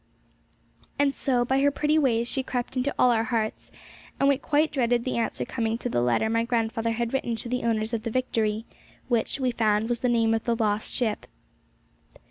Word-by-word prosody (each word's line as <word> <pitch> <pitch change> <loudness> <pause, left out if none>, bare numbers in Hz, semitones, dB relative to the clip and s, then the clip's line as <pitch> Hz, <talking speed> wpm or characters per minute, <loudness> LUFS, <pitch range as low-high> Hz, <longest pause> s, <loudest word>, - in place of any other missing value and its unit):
And 285 -1 +2
so 250 -4 0
by 265 +2 +1
her 285 - +5
pretty 300 +2 +1
ways 235 -5 +1
she 265 - -1
crept 255 0 -4
into 260 +2 0
all 250 - +5
our 225 -1 +1
hearts, 220 -2 -2 0.5
and 275 - +3
we 280 -1 +3
quite 300 +2 +1
dreaded 240 -3 +1
the 255 - -1
answer 230 - -2
coming 225 -2 -2
to 245 - -4
the 120 - 0
letter 125 - +2
my 230 +1 +1
grandfather 230 -1 -1
had 235 +1 -2
written 240 -3 -1
to 225 - -4
the 250 +1 -2
owners 225 -1 0
of 225 - -1
the 230 - -3
Victory, 225 -3 -1 0.4
which, 240 +3 0
we 255 -2 +1
found, 220 -1 +1
was 240 -1 -1
the 250 - 0
name 225 -1 +2
of 225 - -1
the 235 - +1
lost 215 -2 0
ship. 225 -5 -1
235 Hz, 205 wpm, -26 LUFS, 225-255 Hz, 0.5 s, her